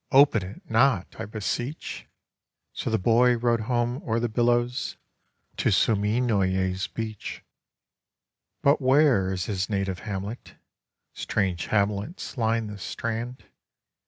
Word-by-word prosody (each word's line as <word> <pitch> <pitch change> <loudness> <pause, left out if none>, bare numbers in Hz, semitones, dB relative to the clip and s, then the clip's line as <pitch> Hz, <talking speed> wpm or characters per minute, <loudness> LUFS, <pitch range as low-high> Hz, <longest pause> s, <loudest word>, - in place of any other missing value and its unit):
Open 140 -5 +6
it 90 +3 -9
not, 115 -4 +2
I - - -3
beseech!" 115 +7 -4 0.7
So - - -3
the 110 - +2
boy 120 +4 +4
row'd 120 0 +2
home 120 +3 -1
o'er 115 0 0
the 120 0 -1
billows 120 +2 +1 0.6
To - - +2
Suminoye's 100 -4 +1
beach. 110 -2 -6 1.2
But 140 +1 +4
where 130 -8 +4
is 90 -2 -2
his 100 -2 -2
native 95 -3 -1
hamlet? 105 +2 -6 0.6
Strange 95 -4 -1
hamlets 105 - -1
line 115 -2 +1
the 105 -1 -7
strand. 115 +5 -4
110 Hz, 115 wpm, -26 LUFS, 100-120 Hz, 1.2 s, Open